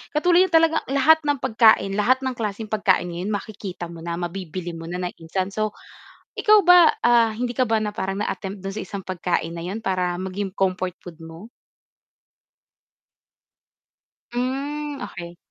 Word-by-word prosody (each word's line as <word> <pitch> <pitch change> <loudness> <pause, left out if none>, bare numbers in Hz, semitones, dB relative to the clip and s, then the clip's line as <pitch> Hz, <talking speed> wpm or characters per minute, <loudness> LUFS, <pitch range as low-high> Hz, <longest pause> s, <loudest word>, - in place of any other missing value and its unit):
katulad 355 +4 +4
niya - - -17
talaga 325 0 +4
lahat 310 +4 +5
ng 285 -2 +1
pagkain, 220 -5 +4
lahat 255 +5 +3
ng 260 - -1
klaseng 215 0 -4
pagkain 190 -4 +2
ngayon 175 +4 -4
makikita 200 -4 -6
mo 170 - -10
na, 170 0 -4
mabibili 175 0 -5
mo 165 0 -8
na 180 +1 -4
ng 180 - -3
instant. 185 +4 -3
So, 215 0 -1 0.7
ikaw 425 -1 +5
ba, 355 -2 +7
ah, 235 -2 +4
hindi 245 +1 -2
ka 255 - +3
ba 220 0 +2
na 210 - -2
parang 195 +1 -3
na-attempt 195 -1 -5
dun 195 - -4
sa - - -3
isang 195 +1 -7
pagkain 175 -2 -2
na 170 - -6
yun 205 +5 -4
para 180 -2 0
maging 190 +1 -4
comfort 185 -2 -1
food 170 -2 -11
mo? 165 +7 -11 2.8
Hmm 280 +4 -3
okey. 170 -2 -8
200 Hz, 165 wpm, -23 LUFS, 180-250 Hz, 2.8 s, ba